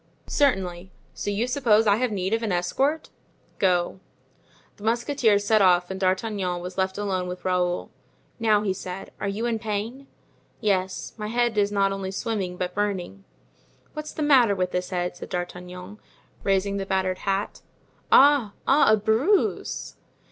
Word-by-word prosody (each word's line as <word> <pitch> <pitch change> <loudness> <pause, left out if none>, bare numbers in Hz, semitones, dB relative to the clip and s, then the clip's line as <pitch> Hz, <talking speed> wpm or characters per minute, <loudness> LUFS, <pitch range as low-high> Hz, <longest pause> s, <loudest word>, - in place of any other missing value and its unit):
"Certainly. 190 -10 0 0.2
So - - -4
you 205 +3 0
suppose 240 -4 +3
I 205 -1 +4
have 250 0 0
need 190 0 -1
of 225 - +1
an 220 -3 -2
escort? 270 - 0 0.5
Go." 180 -1 +1 0.8
The 205 - -14
musketeers 230 -2 +2
set 215 0 +4
off 180 -1 +4
and 190 - -5
D'Artagnan 185 -1 0
was 180 +1 -7
left 190 0 -1
alone 190 -3 -1
with 180 +1 -7
Raoul. 180 -1 0 0.5
"Now," 215 -2 +3
he 195 -3 0
said, 185 0 -7
"are 200 - -2
you 205 +4 -2
in 230 -2 0
pain?" 225 +5 -4 0.5
"Yes; 190 -2 -1
my 210 -1 -4
head 240 0 +1
is 205 -1 +2
not 200 -1 +2
only 195 -1 -4
swimming 195 -3 -3
but 180 0 -3
burning." 185 - -3 0.7
"What's 305 0 -6
the 310 - -3
matter 255 -8 +5
with 185 -1 -1
this 180 0 -2
head?" 180 -1 -2
said - - -9
D'Artagnan, 180 +2 -6 0.4
raising 200 0 +1
the 195 -1 -4
battered 190 -1 0
hat. 195 +1 -2 0.5
"Ah! 275 -7 +6
ah! 280 -2 +5
a 215 - +5
bruise." 225 - 0
200 Hz, 160 wpm, -25 LUFS, 185-225 Hz, 0.8 s, Ah